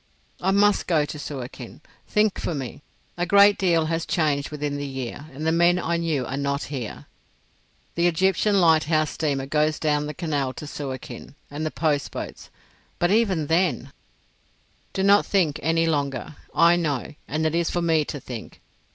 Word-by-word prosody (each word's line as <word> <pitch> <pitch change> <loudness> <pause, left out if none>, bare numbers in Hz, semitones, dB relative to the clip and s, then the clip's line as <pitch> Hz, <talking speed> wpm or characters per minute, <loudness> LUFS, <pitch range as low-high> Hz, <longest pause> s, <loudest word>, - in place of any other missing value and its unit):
"I 190 - +1
must 205 +1 +3
go 155 -4 +3
to 150 - -7
Suakin. 130 -4 -7 0.3
Think 210 -1 +2
for 170 - -2
me. 140 +1 -6 0.4
A 175 0 -1
great 200 +2 +6
deal 170 -4 +3
has 165 +1 -1
changed 150 -5 0
within 150 -1 -3
the 145 0 -4
year, 135 +2 -6
and 145 +4 -6
the 160 - +3
men 170 +2 +4
I 170 -1 -1
knew 160 -6 -1
are 130 - -4
not 140 0 -1
here. 120 -6 -5 0.9
The 170 +1 +2
Egyptian 190 +4 +2
lighthouse 155 -2 +3
steamer 140 -4 -1
goes 150 +2 +1
down 150 -1 0
the 150 - -6
Canal 145 -6 -1
to 150 - -8
Suakin—and 140 +1 -7
the 155 - 0
post 150 -3 0
boats—But 175 +1 -6
even 200 -8 +2
then——" 155 -5 +1 1.0
"Do 190 - -1
not 200 +1 +6
think 170 -7 +1
any 165 +2 +2
longer. 145 -3 -2 0.2
I 170 +1 +5
know, 150 -4 -2
and 155 +2 -1
it 155 - +1
is 170 0 +1
for 175 - -1
me 160 -2 +3
to 145 - -5
think. 120 -3 -9
155 Hz, 170 wpm, -24 LUFS, 145-170 Hz, 1.0 s, great